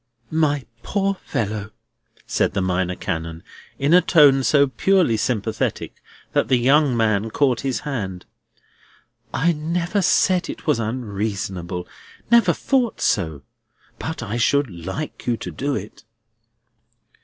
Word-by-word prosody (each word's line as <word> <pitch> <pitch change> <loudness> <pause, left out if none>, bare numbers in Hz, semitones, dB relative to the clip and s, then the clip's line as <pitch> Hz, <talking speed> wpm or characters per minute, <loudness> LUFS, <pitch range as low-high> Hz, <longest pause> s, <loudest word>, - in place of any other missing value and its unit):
"My 145 -4 +1 0.2
poor 195 -1 0
fellow!" 110 - -4 0.6
said - - 0
the 100 - +1
Minor 90 0 0
Canon, 80 -2 -4 0.3
in 140 +4 +2
a 180 - +8
tone 145 -6 +5
so 140 +1 +4
purely 160 +1 +2
sympathetic 110 -1 -2 0.3
that - - +2
the 130 - +3
young 135 +1 +3
man 110 -1 +1
caught 130 0 +1
his 130 -5 -2
hand, 95 -11 -4 1.1
"I 165 +5 +2
never 170 +5 -1
said 180 +1 +2
it - - -7
was 150 -7 +2
unreasonable; 100 -6 -3 0.4
never 235 -7 +6
thought 250 +5 0
so. 80 -8 0 0.6
But 160 -5 -4
I 115 +1 -3
should 140 +1 +2
like 90 - -6
you 120 -1 +1
to - - -6
do 140 +1 -2
it." 105 +2 -7
125 Hz, 130 wpm, -22 LUFS, 100-155 Hz, 1.1 s, a